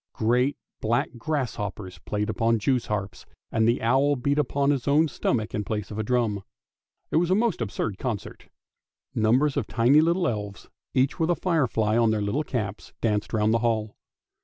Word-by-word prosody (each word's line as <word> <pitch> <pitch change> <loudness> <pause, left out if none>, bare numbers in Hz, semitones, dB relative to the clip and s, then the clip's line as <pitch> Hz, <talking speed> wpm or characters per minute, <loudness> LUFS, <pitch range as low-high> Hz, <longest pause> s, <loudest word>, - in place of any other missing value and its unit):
Great 125 +5 +1 0.2
black 120 +6 +1
gr 155 +6 -1
ss 130 -5 -2
hoppers 100 -3 -6
plaved 105 0 -2
upon 115 -1 +2
Jews' 125 +2 0
harps, 100 -2 -4 0.2
and 110 0 +2
the 120 +1 +1
owl 135 +5 +3
beat 140 +3 0
upon 140 0 +1
his 140 -3 -2
own 150 +3 +4
stomach 110 -6 -1
in 105 - -1
place 105 -1 -4
of 105 - -5
a - - 0
drum. 110 -3 0 0.7
It - - +2
was 170 +1 +2
a 185 - +4
most 215 - +1
absurd 105 -2 -3
concert. 115 -7 -5 0.6
Numbers 130 +7 +2
of 130 - -1
tiny 120 +6 +4
little 170 +2 +2
elves, 105 -3 -5 0.3
each 130 +6 +2
with 165 0 +1
a 175 - +3
firefly 125 - +1
on 115 -1 +4
their 110 -1 +1
little 125 +10 0
caps, 105 -8 -4
danced 105 -2 0
round 110 -1 +2
the 115 - +3
hall. 110 -2 -1
115 Hz, 185 wpm, -26 LUFS, 110-140 Hz, 0.7 s, own